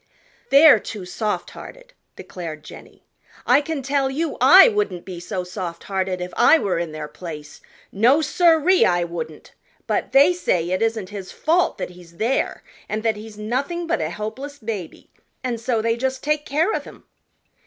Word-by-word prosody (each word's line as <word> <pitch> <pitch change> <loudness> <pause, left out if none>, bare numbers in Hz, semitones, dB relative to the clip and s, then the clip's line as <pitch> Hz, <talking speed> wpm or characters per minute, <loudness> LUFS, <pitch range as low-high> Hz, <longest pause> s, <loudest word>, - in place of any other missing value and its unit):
"They're 280 -3 +7
too 205 -2 -7
soft 210 +3 -3
hearted," - - -12 0.2
declared 160 -4 -8
Jenny. - - -14 0.4
"I 260 +4 +5
can 295 -2 -4
tell 275 0 0
you 305 +3 -2 0.2
I 385 - +10
wouldn't 415 - -1
be 180 -3 -7
so 180 +1 -4
soft 180 -2 -6
hearted 190 -2 -2
if 180 0 -6
I 325 - +6
were 195 - -1
in 170 -2 -3
their 155 -1 -6
place. 150 -1 -9 0.3
No, 240 +9 +4
sir 325 0 +3
ee, 375 0 +5
I 175 -1 +2
wouldn't! 160 -3 -7 0.3
But - - -2
they 285 +6 +6
say 180 - -1
it 185 - 0
isn't 225 -4 -1
his 200 -3 -8
fault 345 +3 +1
that - - -5
he's 175 -1 -16
there, 235 +7 -1 0.3
and 215 +1 -3
that 225 -2 +1
he's 210 0 -11
nothing 270 +11 -3
but 325 - -1
a 155 - -1
helpless 220 - -6
baby, 215 - -7 0.3
and 240 -3 -3
so 230 -2 -1
they 230 0 +1
just 260 +2 -3
take 300 0 -1
care 320 +9 +1
of - - -3
him." - - -14
220 Hz, 180 wpm, -22 LUFS, 180-285 Hz, 0.4 s, I